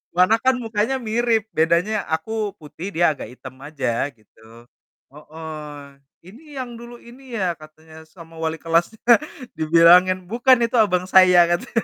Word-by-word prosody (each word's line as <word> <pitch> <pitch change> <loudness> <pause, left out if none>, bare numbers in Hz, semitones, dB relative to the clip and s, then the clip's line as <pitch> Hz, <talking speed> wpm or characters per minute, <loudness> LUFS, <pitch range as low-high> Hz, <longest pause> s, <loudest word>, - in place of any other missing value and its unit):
Warna 185 +5 +3
kan 260 +1 +2
mukanya 225 +1 -2
mirip, 225 -2 -1
bedanya 170 +7 0
aku 210 +6 -3
putih 160 +4 -10
dia 170 -1 +3
agak 145 - -8
hitam 130 0 -12
aja, 140 -4 -3
gitu. 110 +2 -20 0.5
Heeh. 150 -2 -11 0.3
"Ini, 220 - -15 0.2
yang 240 - -11
dulu 240 0 -11
ini 245 +1 -13
ya?" 185 -3 0
katanya, 155 +1 -15
"sama 165 0 -15
wali 160 0 -2
kelasnya," 170 +6 -1 0.6
dibilangin, 175 +4 +4
"Bukan, 240 +6 +3
itu 230 +2 -2
abang 180 -4 +2
saya," 185 -1 +6
katanya. 215 +6 -2
175 Hz, 140 wpm, -21 LUFS, 160-220 Hz, 0.6 s, saya